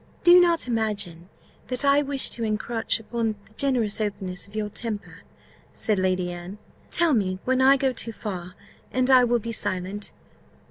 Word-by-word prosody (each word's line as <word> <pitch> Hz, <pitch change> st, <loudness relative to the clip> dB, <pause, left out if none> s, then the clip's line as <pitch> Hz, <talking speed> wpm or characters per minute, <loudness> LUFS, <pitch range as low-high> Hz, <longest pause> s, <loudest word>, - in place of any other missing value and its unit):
"Do 350 Hz, +1 st, +8 dB
not 340 Hz, -5 st, +3 dB
imagine 200 Hz, -7 st, -2 dB, 0.4 s
that 255 Hz, +2 st, -2 dB
I 280 Hz, +1 st, +5 dB
wish 280 Hz, -2 st, 0 dB
to 230 Hz, -, -3 dB
encroach 225 Hz, +1 st, -1 dB
upon 225 Hz, 0 st, -2 dB
the 220 Hz, -, -21 dB
generous 230 Hz, -5 st, 0 dB
openness 195 Hz, -3 st, -3 dB
of 200 Hz, -, -16 dB
your 215 Hz, -1 st, -1 dB
temper," 215 Hz, 0 st, -5 dB, 0.5 s
said 210 Hz, -3 st, 0 dB
Lady 185 Hz, -1 st, 0 dB
Anne; 175 Hz, +3 st, -8 dB, 0.3 s
"tell 340 Hz, -3 st, +3 dB
me 190 Hz, -5 st, +1 dB
when 260 Hz, 0 st, +2 dB
I 270 Hz, +1 st, +6 dB
go 265 Hz, -1 st, +1 dB
too 230 Hz, -1 st, -3 dB
far, 185 Hz, -5 st, -6 dB, 0.4 s
and 255 Hz, +1 st, +2 dB
I 255 Hz, -1 st, +7 dB
will 240 Hz, 0 st, +3 dB
be 230 Hz, 0 st, -5 dB
silent. 195 Hz, -1 st, -2 dB
220 Hz, 170 wpm, -25 LUFS, 200-255 Hz, 0.5 s, Do